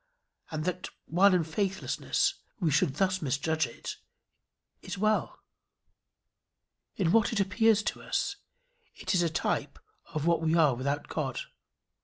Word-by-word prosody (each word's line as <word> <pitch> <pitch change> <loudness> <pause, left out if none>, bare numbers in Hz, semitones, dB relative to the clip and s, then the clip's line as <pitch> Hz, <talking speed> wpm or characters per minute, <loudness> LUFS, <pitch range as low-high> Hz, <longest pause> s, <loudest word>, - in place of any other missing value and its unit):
And 155 0 -3
that, 180 0 -2 0.2
while 190 +5 +5
in 180 -2 +3
faithlessness, 190 +4 0 0.3
we 170 -6 +1
should 145 -1 +2
thus 185 +2 +1
misjudge 155 +1 0
it, 115 - -7 0.8
is - - -6
well. 215 +2 +1 1.6
In 175 -5 +1
what 225 +1 +4
it 225 - 0
appears 210 +2 +3
to - - -3
us, 400 - -1 0.6
it - - -2
is 180 - +4
a 170 - +2
type 160 - -1 0.3
of 155 -1 -2
what 170 -1 +3
we 160 0 +2
are 155 -5 +5
without 140 +4 -2
God. 135 -5 -3
170 Hz, 140 wpm, -29 LUFS, 155-195 Hz, 1.6 s, while